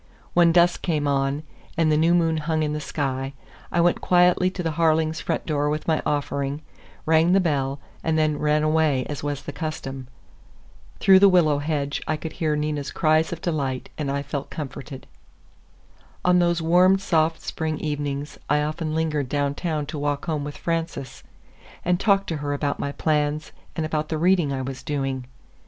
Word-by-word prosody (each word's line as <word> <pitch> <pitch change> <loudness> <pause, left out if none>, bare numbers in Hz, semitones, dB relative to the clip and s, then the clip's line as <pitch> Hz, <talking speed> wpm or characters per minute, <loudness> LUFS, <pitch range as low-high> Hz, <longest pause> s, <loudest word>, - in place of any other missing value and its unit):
When 170 -1 +5
dusk 175 +1 +4
came 150 -4 0
on, 140 +1 0 0.3
and 160 -1 +3
the - - +4
new 165 +3 +4
moon 165 -2 +2
hung 155 0 0
in 150 0 -1
the 150 - -3
sky, 135 -2 -3 0.4
I 170 - +2
went 175 0 +2
quietly 180 0 +4
to 185 -1 -5
the 165 - 0
Harlings' 160 0 +1
front - - -2
door 145 -2 0
with 155 +1 -3
my 160 -1 +2
offering, 140 0 -2 0.4
rang 160 +2 +4
the 195 - +5
bell, 140 -5 0 0.2
and 160 -1 +1
then 155 -1 +1
ran 150 0 +2
away 155 -4 +2
as 145 - -5
was 145 -1 -3
the - - -5
custom. 135 -5 -5 0.9
Through 190 -1 +7
the 200 0 +7
willow 155 -6 +4
hedge 145 -1 -2
I 155 - 0
could 160 +1 -6
hear 155 -2 0
Nina's 150 -1 -2
cries 155 0 +2
of 170 - -5
delight, 140 -6 -2
and 150 -3 -3
I 140 0 -1
felt 140 0 -5
comforted. 135 -2 -7 1.2
On 180 0 +5
those 170 -1 +1
warm, 180 +3 +5
soft 165 -4 +1
spring 160 -1 -3
evenings 145 -1 -4
I 150 +1 +3
often 155 +1 -3
lingered 150 -4 -1
downtown 145 +2 -1
to 150 0 -6
walk 145 -1 -1
home 155 -4 -2
with 145 0 -6
Frances, 165 -6 -3 0.6
and 180 0 +2
talked 195 -1 +3
to 160 - -2
her 145 0 -2
about 145 0 -2
my 140 - -2
plans 150 0 0 0.2
and 160 - -1
about 155 -1 -2
the 160 - -1
reading 175 -3 +3
I 135 -1 -2
was 130 0 -6
doing. 135 -3 -3
155 Hz, 180 wpm, -24 LUFS, 145-165 Hz, 1.2 s, Through